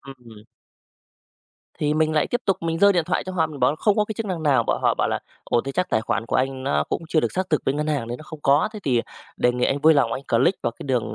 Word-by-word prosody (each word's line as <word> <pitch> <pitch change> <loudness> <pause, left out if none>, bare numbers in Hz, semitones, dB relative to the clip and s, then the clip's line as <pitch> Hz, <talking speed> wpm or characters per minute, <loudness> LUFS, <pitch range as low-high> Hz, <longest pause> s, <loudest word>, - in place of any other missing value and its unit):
Ừm. 130 -3 -13 1.5
Thì 150 0 0
mình 155 0 +1
lại 155 - +2
tiếp 245 - -2
tục 195 -2 +2
mình 165 0 -2
giơ 200 +2 +6
điện 175 -3 +1
thoại 180 - -1
cho 185 - -6
họ, 165 -3 +1
mình 150 -3 -10
bảo 125 - +4
là - - -7
không 205 +5 +2
có 210 - +3
cái 220 - -6
chức 225 - -3
năng 180 -5 -3
nào. 135 -6 +3
Bảo - - +1
họ - - +3
bảo - - 0
là - - -1 0.3
"Ồ, 120 - +1
thế 135 +3 -6
chắc 180 +4 -1
tài 110 - +2
khoản 115 - -2
của - - 0
anh 130 0 -1
nó 75 - +1
cũng - - -3
chưa 160 - +2
được - - -2
xác 185 -1 -2
thực 155 - +1
bên 135 - 0
ngân 150 +1 -1
hàng 145 -7 -1
nên 120 - -5
nó - - -11
không 155 -1 -10
có, 145 +8 +3
thế 215 - -7
thì, 125 -4 +2
à, - - 0 0.3
đề 125 - +2
nghị 125 0 0
anh 135 - +1
vui 160 +1 +6
lòng 120 -5 +2
anh 135 - -4
click 125 +11 +2
vào 120 - 0
cái - - -8
đường 120 -5 -1
150 Hz, 310 wpm, -23 LUFS, 130-170 Hz, 1.5 s, giơ